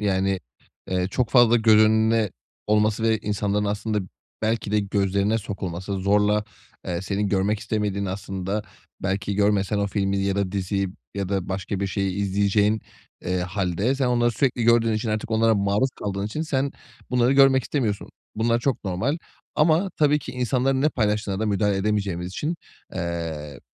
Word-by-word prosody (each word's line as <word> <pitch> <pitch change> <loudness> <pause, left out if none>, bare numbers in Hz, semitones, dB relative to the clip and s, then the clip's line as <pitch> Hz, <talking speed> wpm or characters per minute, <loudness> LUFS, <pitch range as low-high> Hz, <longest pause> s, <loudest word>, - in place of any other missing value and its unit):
Yani, 95 -2 +1 0.5
eee, 90 0 0
çok 120 +2 0
fazla 120 -2 +6
görünme 110 -1 +4 0.4
olması 105 +1 +2
ve 110 -1 +3
insanların 105 0 -1
aslında 105 +1 -1 0.4
belki 110 -1 0
de 105 - +4
gözlerine 100 +2 +1
sokulması, 95 -3 -5
zorla, 105 +2 +2 0.4
eee, 85 0 -2
senin 100 +1 -1
görmek 100 +2 +1
istemediğin, 105 -2 -1
aslında 95 +2 -3 0.4
belki 100 +1 -1
görmesen 100 0 +2
o 100 - +1
filmi 100 0 0
ya 100 0 0
da 100 -1 -1
diziyi 100 0 -1 0.3
ya 100 -2 -2
da 95 -2 -2
başka 95 +1 -3
bir 100 - 0
şeyi 95 -1 -1
izleyeceğin, 100 +2 +2 0.4
eee, 90 +1 0
hâlde 95 +5 0
sen 135 -2 0
onları 120 -1 +2
sürekli 125 0 0
gördüğün 115 -1 +4
için, 110 +1 -2
artık 110 +1 -2
onlara 110 0 +3
maruz 100 +6 +1
kaldığın 100 0 -2
için 150 +9 -3
sen 140 -3 -1 0.4
bunları 125 0 +3
görmek 135 -1 +5
istemiyorsun. 110 -8 -2 0.3
Bunlar 115 +2 +2
çok 125 -4 -1
normal 100 - -1 0.4
ama 165 +5 +3
tabii 150 -1 +4
ki - - -8
insanların 130 +2 +1
ne 150 - +4
paylaştığına 105 -5 -1
da 110 - 0
müdahale 100 -1 +1
edemeyeceğimiz 100 -3 -1
için, 150 - -3 0.4
eee, 80 -5 -4
105 Hz, 155 wpm, -24 LUFS, 95-115 Hz, 0.5 s, fazla